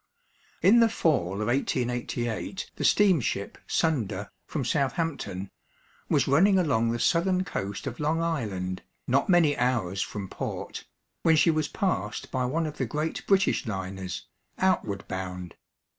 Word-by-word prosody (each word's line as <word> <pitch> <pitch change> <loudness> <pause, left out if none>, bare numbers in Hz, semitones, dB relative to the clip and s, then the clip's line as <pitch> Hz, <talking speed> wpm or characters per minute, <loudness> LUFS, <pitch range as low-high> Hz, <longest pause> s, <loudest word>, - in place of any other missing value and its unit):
In 225 +5 +7
the 230 -1 +6
fall 115 - +1
of - - -2
1888 120 - -2
the - - -4
steamship 165 - +2
Sunda, 105 - 0 0.2
from 140 -5 -2
Southampton, 135 - -1 0.6
was - - +3
running 190 +8 +5
along 115 -10 +2
the 120 - 0
southern 180 +8 +2
coast 100 - -4
of 120 - -5
Long 155 +2 +1
Island, 105 - -2 0.3
not 140 +7 +2
many 165 -5 +5
hours 110 -7 0
from 100 -2 -4
port, - - -5 0.3
when 160 - +5
she 165 +2 +5
was 155 -1 0
passed 120 - -2
by 130 -1 0
one 160 +6 0
of 150 -1 -5
the 130 - 0
great 150 +7 -2
British 195 - +3
liners, 95 -3 -4 0.3
outward 180 - 0
bound. 90 -2 -5
130 Hz, 140 wpm, -27 LUFS, 100-165 Hz, 0.6 s, In